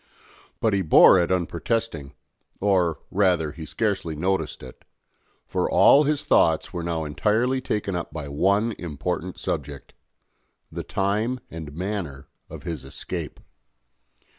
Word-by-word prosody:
But 110 -2 +1
he 100 - +2
bore 90 +2 +7
it 85 +1 0
unprotesting 85 - -2 0.5
or, 90 -5 +1
rather, 90 -6 +2
he 80 0 -9
scarcely 90 -1 -1
noticed 95 +1 -2
it; 65 - -12 0.6
for - - -1
all 145 +2 +6
his 150 0 0
thoughts 80 - +2
were 90 - -3
now 85 -1 -2
entirely 110 - +1
taken 105 -6 -2
up 85 - -4
by 75 -3 -6
one 100 +10 +1
important 90 +2 -4
subject 70 -2 -5 0.8
the - - -4
time 105 +6 -1
and 80 -3 -8
manner 85 -7 -4 0.2
of - - -9
his 85 -5 -5
escape. - - -6
90 Hz, 130 wpm, -24 LUFS, 80-105 Hz, 0.8 s, bore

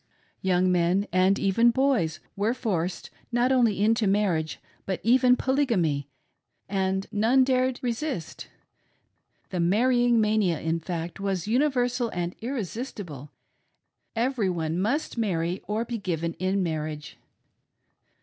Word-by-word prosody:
Young 185 -1 +2
men, 180 +3 +2
and 185 +2 +4
even 205 +4 +3
boys, 245 - +1 0.2
were 215 +5 0
forced, 180 -7 -2 0.2
not 240 +2 +2
only 235 -6 +3
into 225 0 +3
marriage, 190 -6 0 0.3
but 190 -2 -2
even 250 +2 +5
Tolygamy, 200 - +1 0.6
and 190 0 -1
none 225 +5 +4
dared 255 -1 +1
resist. 245 - -3 1.0
The 180 - -2
marrying 240 +6 +3
mania, 210 -6 +2
in 165 +1 -1
fact, 170 +1 -5
was 195 -2 -2
universal 245 -1 +1
and 175 0 -2
irresistible 215 - -5 0.5
— - - -52
every 250 -7 0
one 165 -1 -2
must 240 +5 -1
marry 175 -4 -1
or 215 +3 -1
be 235 -1 -4
given 170 -3 -2
in 190 +1 0
marriage. 155 -2 -4
200 Hz, 120 wpm, -26 LUFS, 175-240 Hz, 1.0 s, even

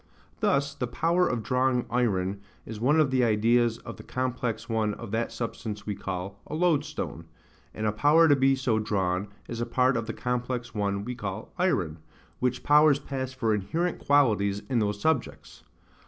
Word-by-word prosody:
Thus, 140 0 +1
the 130 -4 -3
power 170 +8 +1
of 120 -3 -2
drawing 125 0 +1
iron 100 -5 0 0.2
is 110 -1 -7
one 145 +7 +3
of 150 -4 +3
the 130 -1 +3
ideas 115 +1 +3
of - - -9
the - - -11
complex 125 -3 -3
one 110 -3 0
of 115 -3 -8
that 115 +1 -1
substance 105 -3 -5
we 105 - -2
call 95 +1 -5
a 150 - -5
loadstone; 155 - -1 0.5
and 110 - -4
a 105 - +2
power 150 +9 +5
to 145 - +6
be 135 0 +3
so 125 -4 0
drawn 95 -2 -1 0.2
is 120 -1 -5
a - - 0
part 125 +2 +2
of 115 -1 -2
the 115 - -3
complex 125 0 -3
one 100 -1 -1
we 125 - -3
call 105 -1 -6
iron: 90 - 0 0.4
which 125 -1 -1
powers 150 -1 +6
pass 130 -2 -4
for 115 -4 0
inherent 160 - -1
qualities 105 -8 +2
in 125 -3 +2
those 105 -1 -1
subjects. 160 0 -2
120 Hz, 180 wpm, -27 LUFS, 105-135 Hz, 0.5 s, to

